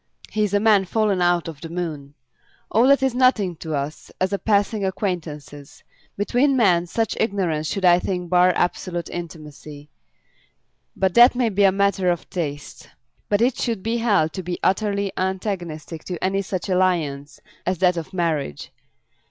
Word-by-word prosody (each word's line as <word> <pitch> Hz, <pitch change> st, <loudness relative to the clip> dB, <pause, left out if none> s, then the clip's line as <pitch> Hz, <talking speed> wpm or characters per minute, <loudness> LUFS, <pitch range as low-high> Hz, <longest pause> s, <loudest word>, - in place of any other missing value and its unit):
He 215 Hz, -, 0 dB
is 205 Hz, -1 st, -1 dB
a -, -, +4 dB
man 210 Hz, -2 st, +4 dB
fallen 205 Hz, -1 st, 0 dB
out 175 Hz, -1 st, +2 dB
of 155 Hz, -4 st, -8 dB
the 165 Hz, -, -7 dB
moon. 155 Hz, -5 st, -5 dB, 0.6 s
All 230 Hz, +4 st, +4 dB
that 275 Hz, -1 st, +4 dB
is 265 Hz, -2 st, +1 dB
nothing 240 Hz, -8 st, +2 dB
to 160 Hz, -1 st, -4 dB
us 145 Hz, +2 st, -5 dB
as 185 Hz, +2 st, 0 dB
passing 205 Hz, 0 st, +1 dB
acquaintances. 160 Hz, -7 st, -5 dB, 0.3 s
Between 255 Hz, +7 st, +2 dB
men 175 Hz, -7 st, +3 dB
such 225 Hz, +4 st, -1 dB
ignorance 180 Hz, -8 st, -1 dB
should 195 Hz, +2 st, -2 dB
I 175 Hz, 0 st, +6 dB
think 180 Hz, -1 st, -3 dB
bar 180 Hz, +1 st, +4 dB
absolute 175 Hz, -1 st, -2 dB
intimacy; 150 Hz, -3 st, -9 dB, 1.0 s
but 190 Hz, -2 st, 0 dB
that 240 Hz, +2 st, +7 dB
may 245 Hz, -2 st, +1 dB
be 200 Hz, -1 st, +2 dB
a 195 Hz, -, +5 dB
matter 195 Hz, -1 st, +1 dB
of 175 Hz, -1 st, -2 dB
taste. 145 Hz, -5 st, -5 dB, 0.4 s
But 205 Hz, +2 st, +2 dB
it 250 Hz, 0 st, +1 dB
should 225 Hz, -6 st, -2 dB
be 230 Hz, +1 st, -1 dB
held 205 Hz, -9 st, +1 dB
to 185 Hz, -, -4 dB
be 175 Hz, 0 st, -4 dB
utterly 200 Hz, 0 st, 0 dB
antagonistic 175 Hz, -5 st, -4 dB
to 180 Hz, -3 st, -5 dB
any 195 Hz, +1 st, +1 dB
such 190 Hz, -1 st, -4 dB
alliance 165 Hz, -6 st, 0 dB, 0.3 s
as 185 Hz, 0 st, 0 dB
that 180 Hz, +1 st, +3 dB
of 165 Hz, +1 st, -6 dB
marriage. 160 Hz, -, -2 dB
185 Hz, 165 wpm, -22 LUFS, 165-205 Hz, 1.0 s, that